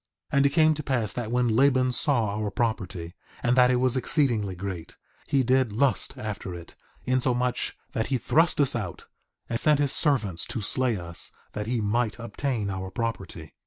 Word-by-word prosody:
3:25 - - +1
And 140 - +4
it - - +1
came 155 +1 +4
to 150 - -5
pass 125 -7 -1
that 120 -3 -4
when 125 0 +2
Laban 130 +2 +3
saw 120 -6 +1
our 105 -1 -2
property, 95 -6 -3 0.3
and 120 0 +2
that 125 -1 +5
it 125 - +3
was 125 0 +2
exceedingly 120 - +2
great, 90 -2 -7 0.3
he 135 -2 +2
did 130 -1 +2
lust 130 +6 +1
after 105 -6 -5
it, 85 -1 -11 0.3
insomuch 125 -1 0
that 110 - -2
he 135 - 0
thrust 160 +8 +2
us 140 -3 +3
out, - - -5 0.4
and 115 - 0
sent 150 -2 +3
his 145 -2 +1
servants 110 - +2
to - - -4
slay 115 +2 +2
us, 85 -1 -5 0.2
that 105 0 -4
he 120 -1 -1
might 105 0 0
obtain 115 -3 -3
our 95 0 -5
property. 95 -8 -5
120 Hz, 185 wpm, -26 LUFS, 105-130 Hz, 0.4 s, that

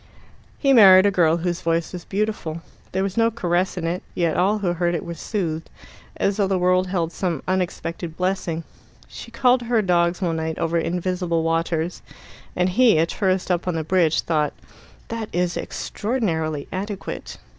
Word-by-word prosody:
He 275 -2 +3
married 190 -5 +8
a 200 - +4
girl 170 -3 +3
whose 175 +1 -2
voice 165 0 -1
was 175 -2 -7
beautiful. 195 -6 -3 0.3
There 190 +1 0
was 195 +2 -3
no 230 0 +4
caress 185 -5 -1
in 170 - -3
it 175 +2 -2
yet 170 -2 +1
all 195 +5 +2
who 185 -4 0
heard 175 0 0
it 165 - -4
were 170 - -5
soothed, 165 -4 -3 0.5
as 195 - 0
though 200 -2 +2
the 190 -1 +1
world 185 +1 +2
held 170 -3 -1
some 175 -5 -2
unexpected 175 -2 -3
blessing. 180 -3 -1 0.4
She - - -10
called 250 +2 +3
to 240 - -8
her 230 -3 +2
dogs 175 -1 +2
one 170 -4 -1
night 160 0 -3
over 165 0 0
invisible 175 0 -1
waters, 165 +1 -1 0.5
and 180 +1 +2
he, 225 0 +4
a 160 - +4
tourist 185 +1 0
up 175 0 -1
on 180 - 0
the 160 - -1
bridge, 165 -1 +2
thought 155 -3 0 0.6
"that 225 -1 -4
is 175 0 0
extraordinarily 165 - -2
adequate." 200 +1 -5
180 Hz, 175 wpm, -22 LUFS, 165-195 Hz, 0.6 s, married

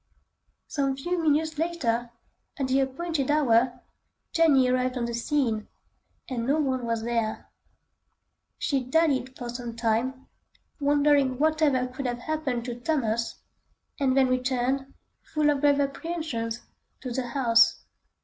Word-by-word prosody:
Some 275 -3 -1
few 350 +5 -1
minutes 315 0 +1
later, 245 -9 0 0.5
at 270 - -1
the 260 +1 +2
appointed 275 +2 -1
hour, 250 -4 +3 0.5
Jenny 295 -6 +5
arrived 255 0 +1
on 240 - -1
the 235 - -4
scene, 235 -3 0 0.6
and 245 -3 -3
no 285 +3 +3
one 260 -4 -1
was 230 -1 -1
there. 230 -2 -2 1.1
She 275 -3 0
dallied 265 -2 +1
for 245 - -6
some 240 -1 -6
time, 235 +3 -1 0.5
wondering 285 -2 +3
whatever 305 -3 +2
could 255 +1 -5
have 245 -1 -2
happened 260 -3 -2
to 240 -1 -5
Thomas, 235 -5 -1 0.6
and 270 -1 +2
then 265 -1 +5
returned, 255 +1 0 0.3
full 300 -1 +1
of 280 -2 -1
grave 285 -1 +4
apprehensions, 275 -6 -3 0.4
to 255 - -5
the 250 0 -2
house. 240 -2 +3
260 Hz, 130 wpm, -27 LUFS, 240-290 Hz, 1.1 s, Jenny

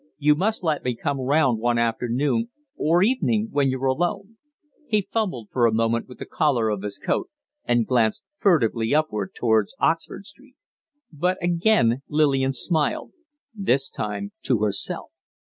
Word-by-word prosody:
You 150 0 +4
must 200 +7 -1
let 155 -3 0
me 125 -1 -1
come 140 +4 -2
round 130 -3 +2
one 120 +1 +1
afternoon 125 - 0 0.3
or 170 - +2
evening, 225 -2 +1
when 140 -2 +2
you're 130 +1 -2
alone." 195 +10 -1 0.5
He 210 -3 0
fumbled 180 - -2
for 120 -2 +3
a - - +1
moment 115 +1 0
with 125 - -12
the - - -7
collar 125 -7 +1
of 105 -2 -2
his 105 0 -4
coat, - - -2 0.4
and 120 -1 +2
glanced 115 -4 +1 0.2
furtively 120 - +2
upward 105 -11 -1
towards 110 -4 +1
Oxford 165 +4 -1
Street. 260 +7 -17 0.6
But 180 +5 0
again 170 - +2
Lillian 140 -3 +2
smiled 150 +4 -1 0.4
this 140 - +1
time 155 - -4
to 120 -5 0
herself. 100 -2 -2
135 Hz, 150 wpm, -23 LUFS, 115-175 Hz, 0.6 s, You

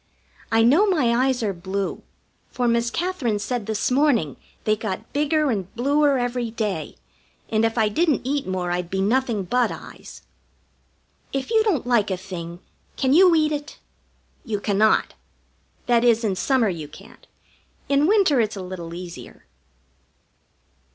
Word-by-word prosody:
I 225 0 +4
know 305 - +5
my 295 -12 +2
eyes 255 -3 0
are 205 -2 0
blue, 190 +2 -4 0.5
for 245 -1 -1
Miss 235 0 +1
Katherine 320 - -1
said 225 +1 -3
this 220 +2 -1
morning 250 - +2 0.3
they 215 - +2
got 205 -3 -6
bigger 300 0 +1
and 195 -5 -3
bluer 285 +3 +2
every 245 -1 -2
day, 210 -9 -3 0.5
and 220 0 +1
if 225 +1 0
I 220 -2 +3
didn't 305 +6 +1
eat 280 -1 -1
more 180 -1 -2
I'd 175 -1 -2
be 190 - -2
nothing 225 +1 +1
but 245 +6 +1
eyes. - - -11 1.1
If 270 - -3
you 445 -1 +4
don't 355 - 0
like 235 -5 +2
a 190 - -1
thing, 175 -2 -8 0.4
can 265 -1 +2
you 355 +1 +6
eat 310 -1 +2
it? 295 0 -5 0.7
You 215 -4 -3
cannot. 210 +1 +2 0.7
That 240 -1 +3
is, 230 -1 +3
in 200 -4 0
summer 255 +3 +2
you 160 -5 -5
can't. - - -16 0.6
In 280 +2 +3
winter 375 - +4
it's 215 -1 -2
a 195 - -6
little 175 -2 -7
easier. 175 -1 -10
235 Hz, 155 wpm, -23 LUFS, 195-275 Hz, 1.1 s, you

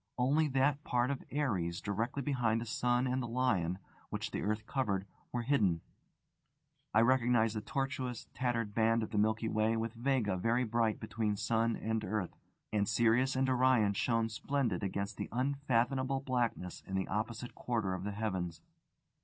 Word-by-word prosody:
Only 145 +5 +3
that 140 +2 +1
part 125 +2 +1
of 140 - -4
Aries 95 - -1
directly 115 +7 -2
behind 120 -5 +1
the 115 - -4
sun 120 +2 +1
and 130 0 0
the 120 - -3
Lion, 105 -8 +1 0.3
which - - -3
the - - -2
earth 110 +1 -1
covered, 100 -9 -1 0.3
were 120 -1 -1
hidden. 105 - +2 1.1
I 110 - +5
recognised 120 -2 +3
the 110 - -2
tortuous, 130 0 -3
tattered 115 -4 -1
band 115 +1 +3
of 110 - -5
the 105 - +1
Milky 110 +2 +1
Way 110 +1 +1
with 115 0 -2
Vega 120 -5 0
very 115 +6 +2
bright 115 -1 +1
between 105 -1 -1
sun 115 +2 +1
and 110 0 -2
earth; 100 -2 -2 0.4
and 105 0 +1
Sirius 120 +4 +3
and 130 0 +2
Orion 130 -5 +4
shone 115 +2 +1
splendid 140 +3 -1
against 100 0 -3
the - - -4
unfathomable 130 0 +1
blackness 120 -9 -1
in 95 - -3
the 95 -1 0
opposite 110 +4 -3
quarter 110 -6 -1
of 95 0 -4
the 105 - -2
heavens. 95 -6 -2
115 Hz, 165 wpm, -33 LUFS, 105-130 Hz, 1.1 s, I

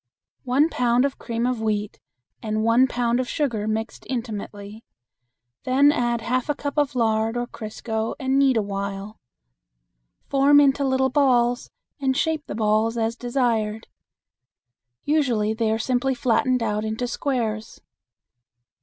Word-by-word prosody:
One 265 +5 +3
pound 245 -4 +2
of 280 - -3
cream 230 0 -2
of 250 -2 -1
wheat 210 -1 -2 0.4
and 215 0 -2
one 230 +3 +4
pound 240 -1 0
of 255 - -2
sugar 235 -8 -1
mixed 220 +1 -3
intimately; 215 -3 -6 0.8
then 275 +3 +4
add 240 -4 0
half 255 +4 -1
a 295 - +1
cup 285 0 -4
of 290 -2 0
lard 225 -1 +1
or 240 - -1
crisco 220 -1 -4
and 265 0 +1
knead 270 -3 +4
awhile. 200 0 -4 1.1
Form 280 +1 +5
into 280 0 +3
little 265 -1 +1
balls 245 -3 +2 0.3
and 265 -1 0
shape 315 0 0
the - - -5
balls 220 +1 +1
as 225 0 0
desired. 235 -3 -1 1.2
Usually 245 -8 +1
they 220 -1 0
are 220 - +1
simply 255 +3 0
flattened 250 0 +1
out 210 -1 -1
into 220 +3 -2
squares. 230 -5 -3
240 Hz, 135 wpm, -23 LUFS, 220-265 Hz, 1.2 s, Form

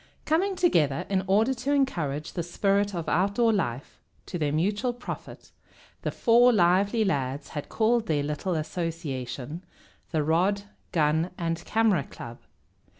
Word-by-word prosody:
Coming 375 +6 +1
together 155 - +2
in 190 -1 +1
order 215 +7 +3
to 265 +3 -1
encourage 155 - -1
the 175 - -2
spirit 195 +3 0
of 170 -2 -4
outdoor 200 +6 +2
life, 135 - -3 0.3
to 175 - -5
their 150 -2 0
mutual 205 - 0
profit, 245 +1 -8 0.5
the - - -1
four 240 +1 +5
lively 200 +2 +3
lads 140 -5 -2
had 145 - -6
called 225 0 +1
their 150 -4 +1
little 150 +5 -2
association 155 -3 -4 0.5
the 155 -2 0
Rod, 185 +6 +1 0.3
Gun, 160 +1 +2
and 165 0 -2
Camera 220 -7 +2
Club. 120 -1 -10
180 Hz, 140 wpm, -27 LUFS, 150-220 Hz, 0.5 s, four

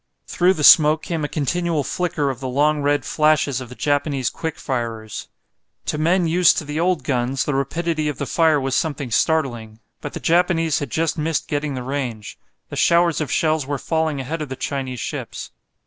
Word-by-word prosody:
Through 180 +2 +2
the 150 - -3
smoke 155 +1 +7
came 165 -3 -3
a - - 0
continual 160 +1 -1
flicker 155 -3 -1
of 125 - -8
the 130 - -4
long 145 +3 +1
red 145 0 +1
flashes 150 -3 +2
of 125 - -8
the 125 - -10
Japanese 145 -4 0
quick 160 -1 -5
firers. 115 -5 -4 0.6
To 150 - -2
men 175 +3 +2
used 170 +1 +4
to - - -2
the 150 +2 -3
old 180 0 +1
guns 130 +1 -1
the 150 - -1
rapidity 155 +3 -1
of 150 - -3
the 140 - -3
fire 160 +2 +3
was 135 -1 -1
something 145 -5 -2
startling. 120 -6 0 0.2
But - - -6
the - - -5
Japanese 165 -2 +2
had 145 - -4
just 160 +4 -1
missed 155 0 -1
getting 145 -1 -2
the 125 - -4
range. 125 -6 -5 0.3
The - - -7
showers 170 -1 +3
of 145 -4 -3
shells 155 -3 +1
were 145 0 -2
falling 160 0 -1
ahead 155 +5 -4
of 150 - -5
the 130 - -4
Chinese 130 -2 -4
ships. - - -6
150 Hz, 195 wpm, -21 LUFS, 135-160 Hz, 0.6 s, smoke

